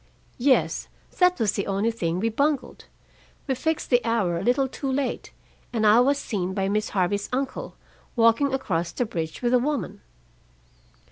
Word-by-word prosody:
"Yes. 260 Hz, +1 st, +2 dB, 0.3 s
That 360 Hz, 0 st, +4 dB
was 215 Hz, -4 st, +2 dB
the 200 Hz, -, -3 dB
only 200 Hz, +4 st, +1 dB
thing 175 Hz, -6 st, -2 dB
we 225 Hz, +3 st, +1 dB
bungled. 280 Hz, +4 st, -1 dB, 0.6 s
We 270 Hz, -, 0 dB
fixed 315 Hz, +5 st, -2 dB
the 245 Hz, 0 st, +4 dB
hour 220 Hz, -7 st, +1 dB
a -, -, -3 dB
little 255 Hz, +3 st, +2 dB
too 270 Hz, +1 st, -4 dB
late, 265 Hz, 0 st, -2 dB, 0.4 s
and 225 Hz, -2 st, 0 dB
I 215 Hz, +2 st, +7 dB
was 275 Hz, +3 st, +3 dB
seen 190 Hz, -8 st, -3 dB
by 195 Hz, -1 st, 0 dB
Miss 215 Hz, +2 st, 0 dB
Harvey's 200 Hz, +1 st, 0 dB
uncle, 265 Hz, +1 st, -3 dB, 0.4 s
walking 230 Hz, +4 st, +4 dB
across 175 Hz, -11 st, -1 dB
the 245 Hz, -, -1 dB
bridge 165 Hz, -1 st, -5 dB
with 240 Hz, +1 st, +2 dB
a 250 Hz, -, +5 dB
woman." 275 Hz, -, -2 dB
230 Hz, 165 wpm, -25 LUFS, 200-265 Hz, 0.6 s, I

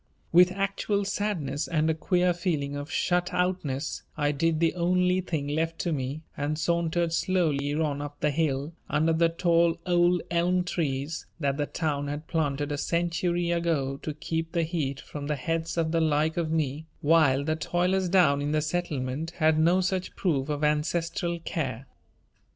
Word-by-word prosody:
With 180 Hz, +2 st, +6 dB
actual 200 Hz, +1 st, -1 dB
sadness 180 Hz, -9 st, -2 dB
and 155 Hz, -2 st, +1 dB
a 160 Hz, -, +3 dB
queer 180 Hz, +2 st, +1 dB
feeling 155 Hz, -5 st, -2 dB
of 145 Hz, +1 st, -5 dB
shut 180 Hz, 0 st, +1 dB
outness 165 Hz, -6 st, -1 dB, 0.2 s
I 145 Hz, -1 st, +2 dB
did 160 Hz, +2 st, +1 dB
the 165 Hz, -1 st, +2 dB
only 180 Hz, +1 st, +2 dB
thing 160 Hz, -6 st, -3 dB
left 165 Hz, +2 st, -1 dB
to 170 Hz, -, -1 dB
me 140 Hz, +1 st, -3 dB
and 145 Hz, +1 st, -2 dB
sauntered 170 Hz, 0 st, 0 dB
slowly 150 Hz, -6 st, +1 dB
on 150 Hz, -2 st, -1 dB
up 145 Hz, 0 st, -7 dB
the 150 Hz, -, +1 dB
hill 145 Hz, 0 st, -1 dB, 0.2 s
under 160 Hz, +2 st, +2 dB
the 165 Hz, +1 st, +3 dB
tall 170 Hz, 0 st, +2 dB
old 175 Hz, -1 st, +3 dB
elm 180 Hz, +1 st, +2 dB
trees 155 Hz, -3 st, -2 dB
that 140 Hz, -3 st, 0 dB
the 145 Hz, -1 st, -1 dB
Town 145 Hz, -3 st, -2 dB
had 145 Hz, +2 st, -4 dB
planted 145 Hz, -3 st, -1 dB
a 145 Hz, -, -2 dB
century 170 Hz, +1 st, 0 dB
ago 160 Hz, -6 st, 0 dB
to 150 Hz, +1 st, -5 dB
keep 165 Hz, +1 st, -3 dB
the 170 Hz, -2 st, +2 dB
heat 155 Hz, -5 st, -2 dB
from 145 Hz, 0 st, -7 dB
the 150 Hz, -, 0 dB
heads 165 Hz, +5 st, -2 dB
of 160 Hz, -1 st, +1 dB
the 165 Hz, 0 st, +2 dB
like 155 Hz, 0 st, +2 dB
of 170 Hz, -2 st, -1 dB
me 155 Hz, -1 st, -1 dB
while 145 Hz, -3 st, +4 dB
the 155 Hz, +2 st, 0 dB
toilers 180 Hz, +3 st, 0 dB
down 165 Hz, -7 st, +4 dB
in 145 Hz, +1 st, -1 dB
the 155 Hz, -, +2 dB
Settlement 155 Hz, -3 st, -2 dB
had 155 Hz, -1 st, +3 dB
no 175 Hz, +4 st, +4 dB
such 185 Hz, 0 st, -2 dB
proof 150 Hz, -6 st, 0 dB
of 150 Hz, 0 st, -2 dB
ancestral 165 Hz, +3 st, 0 dB
care. 135 Hz, -8 st, -3 dB
160 Hz, 175 wpm, -27 LUFS, 145-175 Hz, 0.2 s, With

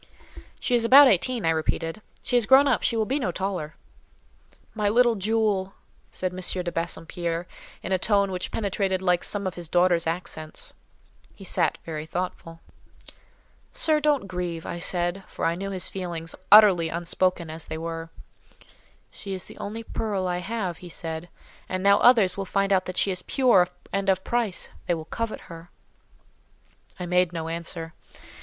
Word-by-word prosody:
"She -, -, -2 dB
is 240 Hz, -1 st, +4 dB
about 270 Hz, +4 st, +9 dB
eighteen," 235 Hz, 0 st, +1 dB
I 165 Hz, -, +4 dB
repeated. 165 Hz, +3 st, -2 dB, 0.2 s
"She 245 Hz, -, -1 dB
is 240 Hz, -3 st, +3 dB
grown 270 Hz, +2 st, +7 dB
up; 255 Hz, -, +2 dB
she 230 Hz, -, 0 dB
will 220 Hz, -, +1 dB
be 270 Hz, +6 st, -1 dB
no 240 Hz, -, -1 dB
taller." 180 Hz, -5 st, -4 dB, 1.0 s
"My 210 Hz, -2 st, 0 dB
little 240 Hz, +2 st, +4 dB
jewel!" 205 Hz, -2 st, 0 dB, 0.3 s
said 185 Hz, -1 st, -3 dB
M. 185 Hz, -, -6 dB
de 180 Hz, -1 st, -1 dB
Bassompierre, 170 Hz, 0 st, -3 dB, 0.4 s
in -, -, -5 dB
a 190 Hz, -, +2 dB
tone 200 Hz, -1 st, +2 dB
which 185 Hz, -1 st, -3 dB
penetrated 195 Hz, -2 st, -1 dB
like 180 Hz, -2 st, +1 dB
some 200 Hz, -1 st, -1 dB
of 185 Hz, -, -2 dB
his 170 Hz, -2 st, -8 dB
daughter's 175 Hz, -1 st, +3 dB
accents. 165 Hz, -2 st, -5 dB, 0.6 s
He -, -, -12 dB
sat -, -, +1 dB
very 155 Hz, -1 st, -5 dB
thoughtful. 165 Hz, -1 st, -5 dB, 1.1 s
"Sir, 310 Hz, -1 st, +3 dB
don't 295 Hz, -6 st, +1 dB
grieve," 175 Hz, -3 st, -4 dB
I 175 Hz, -, -5 dB
said; 175 Hz, +2 st, -1 dB
for -, -, -4 dB
I 165 Hz, -, +2 dB
knew 195 Hz, +3 st, -4 dB
his 190 Hz, -2 st, -1 dB
feelings, 170 Hz, -3 st, -5 dB, 0.2 s
utterly 195 Hz, -6 st, +8 dB
unspoken 170 Hz, 0 st, -1 dB
as 160 Hz, 0 st, -7 dB
they 160 Hz, -, -5 dB
were. 165 Hz, 0 st, -5 dB, 1.0 s
"She 195 Hz, -1 st, -7 dB
is 185 Hz, -, -7 dB
the -, -, -13 dB
only 220 Hz, +3 st, -5 dB
pearl 205 Hz, -4 st, -2 dB
I 180 Hz, 0 st, -1 dB
have," 190 Hz, -3 st, -3 dB
he 180 Hz, -, -11 dB
said; 160 Hz, +1 st, -6 dB, 0.4 s
"and 185 Hz, 0 st, -2 dB
now 200 Hz, 0 st, +5 dB
others 220 Hz, -7 st, +5 dB
will 195 Hz, -, -3 dB
find 195 Hz, +1 st, +1 dB
out 185 Hz, -1 st, +2 dB
that 185 Hz, -, -6 dB
she 195 Hz, -, +2 dB
is 180 Hz, -1 st, -3 dB
pure 240 Hz, -10 st, +4 dB, 0.3 s
and 195 Hz, 0 st, 0 dB
of 190 Hz, 0 st, +2 dB
price: 235 Hz, -6 st, -1 dB, 0.2 s
they 175 Hz, -, +2 dB
will 160 Hz, -1 st, -7 dB
covet 230 Hz, +6 st, -4 dB
her." 165 Hz, -1 st, -12 dB, 1.3 s
I 180 Hz, -, -3 dB
made 180 Hz, 0 st, +2 dB
no 165 Hz, -2 st, -4 dB
answer. 165 Hz, 0 st, -4 dB
185 Hz, 175 wpm, -25 LUFS, 170-205 Hz, 1.3 s, about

